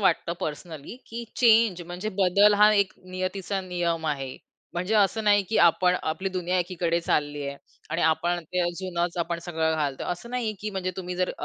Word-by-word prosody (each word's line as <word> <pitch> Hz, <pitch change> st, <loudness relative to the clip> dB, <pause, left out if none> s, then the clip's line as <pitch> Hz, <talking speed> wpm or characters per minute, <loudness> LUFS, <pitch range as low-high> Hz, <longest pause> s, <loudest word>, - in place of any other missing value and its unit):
वाटतं 170 Hz, -3 st, +2 dB
पर्सनली 155 Hz, +4 st, -6 dB
की 235 Hz, +1 st, -6 dB
चेंज, 225 Hz, -6 st, +4 dB
म्हणजे 175 Hz, +4 st, -5 dB
बदल 200 Hz, +3 st, +5 dB
हा 210 Hz, 0 st, +8 dB
एक 200 Hz, -2 st, +2 dB, 0.2 s
नियतीचा 190 Hz, +1 st, -2 dB
नियम 170 Hz, -2 st, -1 dB
आहे. 135 Hz, -4 st, -3 dB, 0.4 s
म्हणजे 180 Hz, +5 st, -1 dB
असं 215 Hz, +1 st, +3 dB
नाही 205 Hz, -1 st, +5 dB
की 225 Hz, -, 0 dB
आपण 180 Hz, +2 st, +4 dB
आपली 190 Hz, +5 st, -2 dB
दुनिया 180 Hz, 0 st, 0 dB
एकीकडे 170 Hz, -1 st, 0 dB
चालली 145 Hz, -3 st, 0 dB
आहे. 140 Hz, -, -5 dB, 0.3 s
आणि 165 Hz, -, 0 dB
आपण 170 Hz, +2 st, +1 dB
ते 180 Hz, +3 st, -2 dB
अ, 175 Hz, -, +2 dB
जुनंच 175 Hz, -2 st, -2 dB
आपण 170 Hz, 0 st, -1 dB
सगळं 160 Hz, -2 st, 0 dB
घालतो. 145 Hz, -3 st, -2 dB
असं 180 Hz, +7 st, -5 dB
नाही 245 Hz, -3 st, -1 dB
की 215 Hz, -, -3 dB
म्हणजे 190 Hz, -2 st, -2 dB
तुम्ही 180 Hz, -1 st, -4 dB
जर 185 Hz, 0 st, 0 dB
180 Hz, 185 wpm, -26 LUFS, 170-200 Hz, 0.4 s, हा